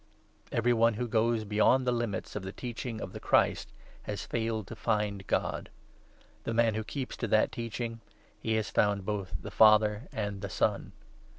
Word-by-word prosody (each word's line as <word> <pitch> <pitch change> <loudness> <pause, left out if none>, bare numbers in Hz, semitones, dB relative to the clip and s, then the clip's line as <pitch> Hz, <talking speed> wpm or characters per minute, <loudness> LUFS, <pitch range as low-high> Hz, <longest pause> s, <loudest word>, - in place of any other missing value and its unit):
Every 120 +1 +2
one 115 -1 +3
who 120 +3 -2
goes 115 0 +2
beyond 110 +5 +3
the 125 - +2
9 120 - 0
limits 115 -4 -3
of 105 - -2
the 95 0 -6
Teaching 120 0 -5
of - - -6
the - - -6
Christ - - +2 0.3
has 105 - -5
failed 110 -2 -2
to - - -8
find 105 -3 -1
God; - - -1 0.7
the 115 - -2
man 115 -1 +4
who 110 +1 -2
keeps 130 +4 -5
to 115 - -2
that 110 +1 +3
Teaching 115 0 -4 0.2
— - - -33
he 110 -1 0
has 110 -1 -1
found 100 -2 +2
both 100 -2 -3
the - - -8
Father 110 +2 +5
and 105 -2 -3
the - - -4
Son. - - 0
110 Hz, 190 wpm, -30 LUFS, 105-115 Hz, 0.7 s, Father